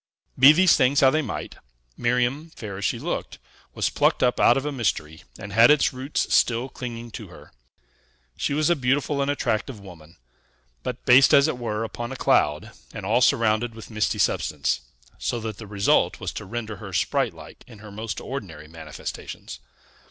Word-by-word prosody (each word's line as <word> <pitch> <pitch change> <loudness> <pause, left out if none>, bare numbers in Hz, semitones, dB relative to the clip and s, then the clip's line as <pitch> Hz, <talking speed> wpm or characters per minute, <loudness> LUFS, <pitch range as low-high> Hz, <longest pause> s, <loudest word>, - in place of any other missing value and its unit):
Be 135 +3 +8
these 180 +3 +5
things 140 +4 +3
how 135 -1 +6
they 155 - +1
might, 125 -8 -6 0.4
Miriam, 125 +6 0
fair 100 -3 -7
as 100 - -3
she - - 0
looked, - - -4 0.4
was - - 0
plucked - - +2
up 125 -1 +2
out 120 - +5
of 135 - -3
a 150 - -2
mystery, 80 - -2 0.2
and 100 0 -9
had 115 +3 +7
its 150 -2 +4
roots 130 +3 -2
still 120 +2 +2
clinging 120 -2 -7
to - - -8
her. - - -15 0.8
She 140 - -2
was 155 +2 +2
a - - +4
beautiful 140 +1 0
and 140 - 0
attractive 125 -3 -2
woman, 85 -5 -14 0.6
but 125 0 -6
based, 130 +3 +7
as 140 +1 +5
it 140 -6 -3
were, 115 -2 -3
upon 120 +2 -6
a - - -5
cloud, 75 - +1 0.2
and - - -7
all - - +2
surrounded 115 +1 +2
with 115 +1 -11
misty 105 -1 0
substance; 65 - 0 0.4
so 120 - -2
that 110 -2 -6
the 110 - -9
result 100 0 +1
was - - -4
to 105 - -7
render 110 0 -5
her 100 -3 -9
sprite - - 0
like - - -13
in 115 - -14
her 105 0 -12
most 110 0 -5
ordinary 90 - -7
manifestations. 80 -6 -8
120 Hz, 185 wpm, -24 LUFS, 105-135 Hz, 0.8 s, Be